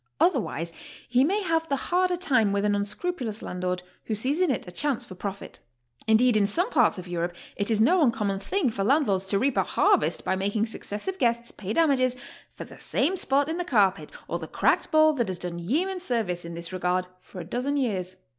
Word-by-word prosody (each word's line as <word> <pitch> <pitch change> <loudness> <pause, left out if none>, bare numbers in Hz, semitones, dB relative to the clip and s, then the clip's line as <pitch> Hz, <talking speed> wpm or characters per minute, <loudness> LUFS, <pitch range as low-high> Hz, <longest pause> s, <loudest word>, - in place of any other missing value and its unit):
Otherwise 210 - 0 0.3
he 250 +2 +3
may 400 +8 +1
have 325 -2 0
the 280 - +2
harder 360 +5 +1
time 250 - +2
with 200 +1 0
an 205 - +2
unscrupulous 215 - -3
landlord 180 0 -3 0.2
who 220 - -2
sees 270 - 0
in 365 - +3
it 245 -7 -1
a - - -7
chance 280 +6 0
for - - -10
profit. 195 +2 -7 0.5
Indeed, 225 +2 +4
in 205 -2 +3
some 355 - 0
parts - - +3
of 180 0 -8
Europe 175 0 -3 0.2
it 200 +1 -2
is 220 -2 +2
no 335 +11 +4
uncommon 210 -8 +1
thing 280 - 0
foi'* 200 - -4
landlords 210 -6 +2
to 200 +1 +1
reap 260 +4 +1
a - - +4
harvest - - +2
by 190 - +1
making 205 +3 0
successive 225 - -5
guests 235 0 +1
pay 200 0 -6
damages 255 -3 +2 0.4
for - - -7
the - - -13
same 325 +8 +1
spot 280 -5 +2
in 325 +2 -3
the - - 0
car 210 - +4
pet 195 - -12 0.2
or - - -3
the - - -7
cracked - - +1
bowl 310 -1 +5
that 240 -6 -1
has 185 -1 0
done 175 -1 -4
yeoman 335 - -1
service 220 - -1
in 170 0 -7
this 170 +1 -7
regard 180 0 0 0.2
for 185 - -11
a 170 - -6
dozen 250 - -2
years. 190 -8 -1
225 Hz, 215 wpm, -26 LUFS, 190-290 Hz, 0.5 s, bowl